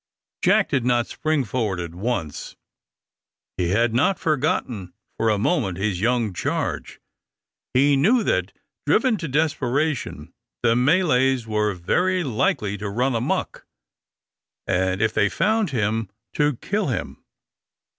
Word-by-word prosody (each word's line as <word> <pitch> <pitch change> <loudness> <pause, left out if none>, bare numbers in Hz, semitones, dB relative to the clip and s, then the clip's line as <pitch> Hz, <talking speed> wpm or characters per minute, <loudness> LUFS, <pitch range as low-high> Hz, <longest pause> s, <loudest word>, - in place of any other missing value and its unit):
Jack - - +3
did 130 - 0
not 120 -1 +2
spring 155 -3 -1
forward 105 -4 -2
at 85 -1 -5
once. 90 -6 -4 1.0
He 90 -1 -1
had 115 +4 +2
not 140 +11 +2
forgotten 125 - -1 0.2
for 115 - +1
a 105 - +2
moment 105 - 0
his 95 -2 -1
young 115 -3 +1
charge. - - -3 0.8
He 140 +2 +5
knew 215 - +3
that, - - 0 0.4
driven 255 -5 +3
to 165 - -4
desperation, 145 -1 -1 0.3
the 115 -1 +4
Malays 135 -3 +3
were 105 -2 0
very 180 - +1
likely 105 -5 0
to 105 -1 -4
run 125 +6 0
amuck, 115 +1 -2 1.0
and, 95 +2 0
if 110 0 +1
they 105 -2 +2
found 215 - +1
him, 110 -4 -1 0.2
to 150 -2 +1
kill 205 - -2
him. 125 - -4
120 Hz, 130 wpm, -23 LUFS, 105-150 Hz, 1.0 s, He